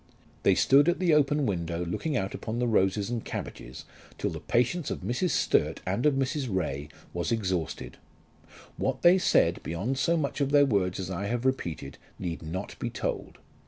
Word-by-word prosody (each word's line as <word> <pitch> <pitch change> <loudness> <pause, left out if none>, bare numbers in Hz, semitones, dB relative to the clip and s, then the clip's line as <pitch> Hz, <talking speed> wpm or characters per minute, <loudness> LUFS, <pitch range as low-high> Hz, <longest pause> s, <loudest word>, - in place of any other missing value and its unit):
They - - +4
stood 140 +4 +5
at 175 - +1
the 180 -3 +2
open 145 -1 +3
window 85 -4 -2
looking 140 - -2
out 95 -3 -2
upon 110 +1 -4
the 125 - +1
roses 105 -1 +1
and 120 -2 -2
cabbages 65 +2 -7 0.3
till - - -1
the - - -5
patience 125 +7 0
of - - -4
Mrs. 125 +10 0
Sturt - - +2
and 100 +10 +1
of 145 - +3
Mrs. 135 +1 -1
Ray 75 -6 -2 0.2
was 85 -2 -2
exhausted. 95 -8 -2 0.8
What 135 0 -2
they 180 +2 +7
said, 85 - +3
beyond 105 +11 -2
so 170 +5 +2
much 145 -1 -2
of 140 - +2
their 145 0 +6
words 95 -8 0
as 95 0 -4
I 100 +3 -3
have 120 +3 -2
repeated, 85 - -2 0.2
need 85 -3 -4
not 85 +5 -6
be - - -2
told. - - -4
115 Hz, 185 wpm, -28 LUFS, 90-140 Hz, 0.8 s, they